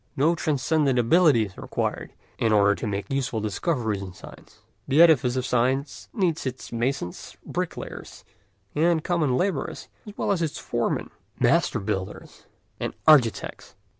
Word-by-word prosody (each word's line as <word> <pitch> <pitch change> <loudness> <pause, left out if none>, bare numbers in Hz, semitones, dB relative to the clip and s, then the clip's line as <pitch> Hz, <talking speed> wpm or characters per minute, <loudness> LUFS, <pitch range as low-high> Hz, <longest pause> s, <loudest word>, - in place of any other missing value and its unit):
No 155 +5 +3
transcendent 150 -3 +1
ability 130 -1 +4
is 95 - -12
required - - -3 0.3
in 115 - +2
order 100 -1 +5
to 110 - -5
make 100 +3 -4
useful 135 -4 -1
discoveries 110 - -1
in 95 -2 -7
science; - - -14 0.3
the 140 - +2
edifice 145 -7 +5
of 130 -1 -1
science 130 +3 -1
needs 175 - -1
its 130 0 -6
masons, 120 -6 -3
bricklayers, - - -6 0.5
and 160 +1 +2
common 155 -8 +1
labourers 185 -3 -2 0.2
as 210 - -10
well - - 0
as 190 -4 0
its 160 -3 -2
foremen, - - -2 0.3
master - - +2
builders, 95 -2 -5 0.3
and - - -4
architects. 135 -8 +3
130 Hz, 140 wpm, -25 LUFS, 110-160 Hz, 0.5 s, order